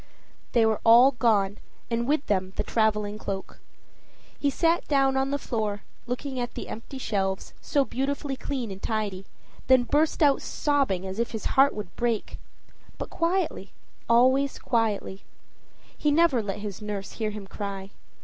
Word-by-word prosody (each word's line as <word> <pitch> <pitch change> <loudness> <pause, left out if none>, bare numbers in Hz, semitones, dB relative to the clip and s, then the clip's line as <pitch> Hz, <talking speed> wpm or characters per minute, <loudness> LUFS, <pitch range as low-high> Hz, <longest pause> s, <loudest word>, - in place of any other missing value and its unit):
They 235 -2 +5
were 220 -1 +1
all 240 +4 +8
gone 210 -6 +1 0.3
and 235 +1 0
with 295 0 +1
them 190 -2 0
the - - -1
traveling 210 -2 0
cloak. 195 -2 -5 0.8
He 285 - +2
sat 335 +4 +1
down 270 -2 +3
on 265 0 +1
the 285 - 0
floor, 215 -6 -3 0.2
looking 255 +2 -3
at 240 -1 -4
the - - -6
empty 230 +5 -7
shelves, 195 -6 -2
so 285 -2 +1
beautifully 275 +2 -2
clean 260 -5 -4
and 190 0 -8
tidy, 205 -4 -2 0.4
then 260 -1 +6
burst 300 +5 +2
out 280 -2 +4
sobbing 275 -11 0
as 190 +3 -5
if 235 - 0
his 220 - -5
heart 275 +1 +5
would 205 -4 -7
break. 235 -3 -2 0.6
But - - -6
quietly 335 - -1 0.4
always 260 +4 +4
quietly. 215 -4 -1 0.7
He 300 - 0
never 295 -5 +4
let 200 -2 -4
his 205 -2 -6
nurse 205 -2 -5
hear 220 -2 -2
him 210 -1 -7
cry. 195 -1 -6
230 Hz, 160 wpm, -26 LUFS, 205-275 Hz, 0.8 s, all